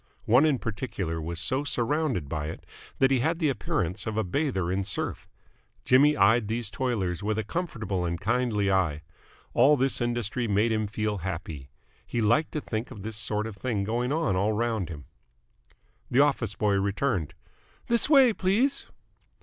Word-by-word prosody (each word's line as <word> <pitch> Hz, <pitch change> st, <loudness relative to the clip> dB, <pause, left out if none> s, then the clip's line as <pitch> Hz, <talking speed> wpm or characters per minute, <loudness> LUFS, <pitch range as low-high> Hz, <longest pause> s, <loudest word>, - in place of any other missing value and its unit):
One 125 Hz, +7 st, +5 dB
in 145 Hz, -4 st, +2 dB
particular 100 Hz, -8 st, -4 dB
was 85 Hz, +1 st, -4 dB
so 130 Hz, -, +1 dB
surrounded 135 Hz, -, -1 dB
by 75 Hz, 0 st, -3 dB
it 80 Hz, -, -8 dB, 0.3 s
that 135 Hz, 0 st, +3 dB
he 130 Hz, -, +3 dB
had 160 Hz, +7 st, +1 dB
the 160 Hz, -4 st, +1 dB
appearance 95 Hz, -5 st, -2 dB
of 110 Hz, 0 st, -3 dB
a 110 Hz, -, +2 dB
bather 95 Hz, -, -1 dB
in 95 Hz, +1 st, 0 dB
surf. 95 Hz, -1 st, -4 dB, 0.6 s
Jimmy 145 Hz, +4 st, +5 dB
eyed 110 Hz, +2 st, +4 dB
these 115 Hz, 0 st, -1 dB
toilers 110 Hz, -, -1 dB
with 105 Hz, +1 st, -1 dB
a 110 Hz, -, 0 dB
comfortable 110 Hz, -, -3 dB
and 85 Hz, 0 st, -2 dB
kindly 105 Hz, -1 st, +1 dB
eye. 85 Hz, -6 st, +1 dB, 0.5 s
All 140 Hz, +5 st, +5 dB
this 135 Hz, -1 st, +1 dB
industry 120 Hz, 0 st, -1 dB
made 105 Hz, +2 st, +2 dB
him 110 Hz, -1 st, 0 dB
feel 105 Hz, -1 st, -2 dB
happy. 85 Hz, -6 st, -6 dB, 0.3 s
He 120 Hz, -, -3 dB
liked 120 Hz, +9 st, +2 dB
to 150 Hz, -, -2 dB
think 110 Hz, -1 st, -4 dB
of 105 Hz, -7 st, -10 dB
this 110 Hz, 0 st, -5 dB
sort 105 Hz, 0 st, -1 dB
of 110 Hz, -2 st, -6 dB
thing 100 Hz, 0 st, -2 dB
going 120 Hz, +5 st, -1 dB
on 150 Hz, -, +1 dB
all 100 Hz, +4 st, +1 dB
round 110 Hz, -4 st, -1 dB
him. 75 Hz, -5 st, -8 dB, 1.0 s
The 125 Hz, +3 st, +4 dB
office 130 Hz, -8 st, +1 dB
boy 105 Hz, -2 st, +1 dB
returned. 100 Hz, -, -1 dB, 0.5 s
"This 235 Hz, +4 st, +1 dB
way, 270 Hz, -6 st, +6 dB
please." 215 Hz, +9 st, +1 dB
110 Hz, 175 wpm, -27 LUFS, 95-130 Hz, 1.0 s, way